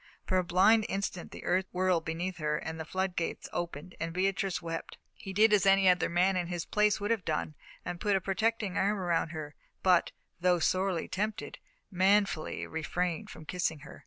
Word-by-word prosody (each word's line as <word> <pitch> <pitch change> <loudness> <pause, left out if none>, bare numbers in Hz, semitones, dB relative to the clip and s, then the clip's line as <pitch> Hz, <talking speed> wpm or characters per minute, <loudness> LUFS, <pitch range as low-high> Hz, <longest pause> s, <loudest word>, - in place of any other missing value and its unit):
For 185 -2 +2
a - - +1
blind 200 +5 +4
instant 195 -2 -3
the - - -10
earth 185 +1 +1
whirled 180 -2 +1
beneath 175 +3 -3
her, 150 -2 -1
then 160 0 -4
the 160 - -4
flood 185 +2 -2
gates 165 - -3
opened 175 0 -5
and 165 0 -2
Beatrice 195 +1 0
wept. 165 -1 -6 0.2
He 195 - -8
did 215 +3 +4
as 200 -2 +4
any 195 0 +5
other 180 0 +4
man 180 +3 +2
in 175 -1 -1
his 175 -1 -3
place 210 0 +2
would 205 +2 -1
have 225 -5 0
done 155 -1 -2 0.3
and 175 -1 -5
put 205 -2 +2
a - - +3
protecting 205 +1 -1
arm 205 +2 +2
around 170 -3 0
her, 155 -2 -6 0.3
but, 180 -2 +4 0.3
though 180 0 +3
sorely 185 +1 0
tempted, 215 +3 -3 0.3
manfully 195 -2 +2
refrained 175 +5 -2
from 160 - -11
kissing 160 -3 -2
her. 150 - -11
185 Hz, 190 wpm, -30 LUFS, 170-195 Hz, 0.3 s, any